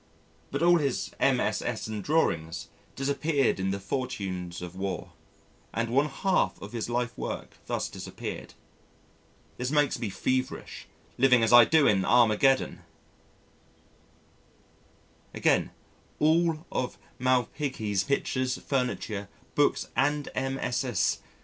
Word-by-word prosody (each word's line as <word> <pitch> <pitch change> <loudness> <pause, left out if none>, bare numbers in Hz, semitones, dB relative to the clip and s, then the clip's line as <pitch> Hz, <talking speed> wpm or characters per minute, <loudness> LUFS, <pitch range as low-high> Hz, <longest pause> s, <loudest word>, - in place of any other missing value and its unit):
But 140 +4 -2
all 175 0 +6
his 140 -4 -1
MSS. - - +1
and 110 -2 -4
drawings 85 - 0 0.3
disappeared 140 -2 +1
in 95 0 0
the 100 +1 -2
fortunes 95 -7 -4
of 90 0 -8
war, 95 -1 -4 0.6
and 115 0 -1
one 140 +4 +3
half 185 +7 0
of 100 - -9
his 115 -1 -3
life 120 0 -1
work - - -6
thus - - -1
disappeared. - - -7 1.0
This 125 +1 -2
makes 145 -1 +2
me 110 - -2
feverish, 130 +6 -2 0.3
living 125 -2 +5
as 115 - +3
I 120 -1 +10
do 160 +1 +4
in 100 -2 +4
Armageddon! 120 +4 +3 2.6
Again, - - +2 0.5
all 165 +2 +3 0.6
Malpighi's 125 -5 0
pictures, 130 -1 0
furniture, 120 -6 -2 0.2
books 145 - +2
and 145 +3 +1
MSS. 130 -5 0
125 Hz, 110 wpm, -28 LUFS, 105-140 Hz, 2.6 s, I